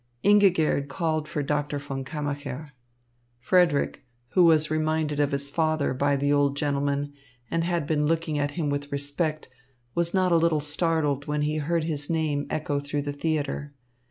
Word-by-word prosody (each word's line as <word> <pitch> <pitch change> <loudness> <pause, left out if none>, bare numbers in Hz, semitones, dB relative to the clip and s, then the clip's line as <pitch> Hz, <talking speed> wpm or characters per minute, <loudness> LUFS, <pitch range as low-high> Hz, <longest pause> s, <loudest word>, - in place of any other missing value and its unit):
Ingigerd 185 -8 +4
called 155 0 -1
for 150 -2 -2
Doctor 145 0 -1
von 140 -2 -5
Kammacher. 145 0 -5 0.7
Frederick, 160 +2 +2 0.3
who 180 +4 +4
was 155 -2 +4
reminded 155 -1 0
of 145 0 +2
his 140 0 -1
father 155 0 0
by 140 +2 +1
the 145 +1 +1
old 140 -1 +2
gentleman 145 -1 -1 0.4
and 165 0 +1
had 170 -3 0
been 150 -1 +1
looking 160 -2 0
at 145 0 0
him 150 -4 0
with 145 0 -3
respect, 145 +2 -2 0.5
was 170 0 +1
not 185 -2 +2
a 170 - +5
little 165 -2 +2
startled 150 -2 0
when 150 0 0
he 150 +1 0
heard 165 +2 0
his 150 -3 -3
name 155 -3 0
echo 150 -2 -1
through 145 0 -3
the 145 0 -3
theatre. 145 -1 -2
150 Hz, 165 wpm, -26 LUFS, 145-160 Hz, 0.7 s, a